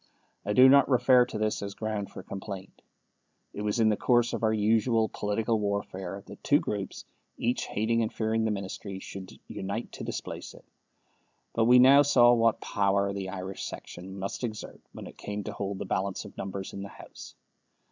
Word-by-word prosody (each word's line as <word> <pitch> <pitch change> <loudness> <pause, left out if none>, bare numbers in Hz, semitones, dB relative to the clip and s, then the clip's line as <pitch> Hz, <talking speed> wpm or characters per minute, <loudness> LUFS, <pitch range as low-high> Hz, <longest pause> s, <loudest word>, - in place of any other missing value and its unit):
I 105 - -1
do 130 +4 +8
not 140 +2 +6
refer 125 -1 +5
to 115 - -5
this 110 0 -1
as 100 0 -5
ground 110 -2 -3
for - - -9
complaint. 95 -1 -8 0.7
It 105 - -5
was 105 +2 -1
in 110 -1 +5
the 105 - +3
course 120 +1 +2
of - - -2
our 110 -1 +3
usual 110 +1 +2
political 110 +2 -1
warfare 100 -2 -3
that - - -12
two 145 - +5
groups, 100 -8 -4 0.3
each 120 +2 -1
hating 115 +2 0
and 110 - -1
fearing 110 0 0
the 110 - +1
Ministry, 100 -1 -5
should 95 -1 -9
unite 100 +4 -5
to - - -8
displace - - -6
it. - - -16 0.9
But 115 - +2
we 125 +2 +7
now 135 +3 +8
saw 120 -4 +6
what 115 -1 +3
power 100 0 +1
the 95 -1 -4
Irish 95 0 -6
section 95 +2 -8
must 95 +5 -5
exert 110 -3 -5
when - - -9
it - - -12
came 105 0 -4
to 105 - -5
hold 100 -1 -4
the 100 - -5
balance 95 +1 -2
of - - -11
numbers 95 0 -5
in 100 - -6
the 100 - -6
House. - - -12
105 Hz, 190 wpm, -28 LUFS, 100-115 Hz, 0.9 s, do